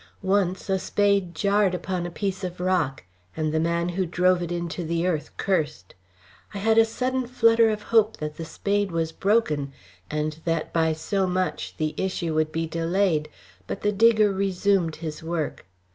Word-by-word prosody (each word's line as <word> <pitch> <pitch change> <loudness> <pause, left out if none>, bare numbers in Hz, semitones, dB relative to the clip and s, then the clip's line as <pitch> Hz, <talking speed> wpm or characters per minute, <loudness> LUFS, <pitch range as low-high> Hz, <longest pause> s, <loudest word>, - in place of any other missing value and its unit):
Once 190 -1 +1
a 190 -1 +1
spade 200 -3 +1
jarred 200 -1 +2
upon 180 -1 -3
a - - -5
piece 195 +2 -3
of 180 -1 -5
rock, 180 -7 0 0.3
and 155 -1 -1
the 160 - +2
man 170 +1 0
who 185 +2 -1
drove 180 +1 +2
it 175 -1 -4
into 175 0 -3
the 170 +1 -1
earth 165 -5 -1
cursed. 155 - -1 0.6
I - - -2
had 220 +3 +3
a 225 - +7
sudden 255 +2 -2
flutter 230 -2 +4
of 210 -1 -3
hope 220 -1 +3
that 150 0 -5
the 165 - -6
spade 200 +4 -1
was 165 -1 -1
broken, 160 -9 +1 0.4
and 150 +1 -2
that 165 -2 -1
by 160 -1 +2
so 190 +5 -1
much 185 0 -2
the 155 -1 -1
issue 180 -3 -2
would 155 0 +1
be 165 +1 -1
delayed, 165 -1 0 0.4
but - - -5
the 210 - +2
digger 215 -1 +4
resumed 190 -3 +1
his 155 -2 -6
work. 160 - -3
180 Hz, 175 wpm, -25 LUFS, 160-200 Hz, 0.6 s, a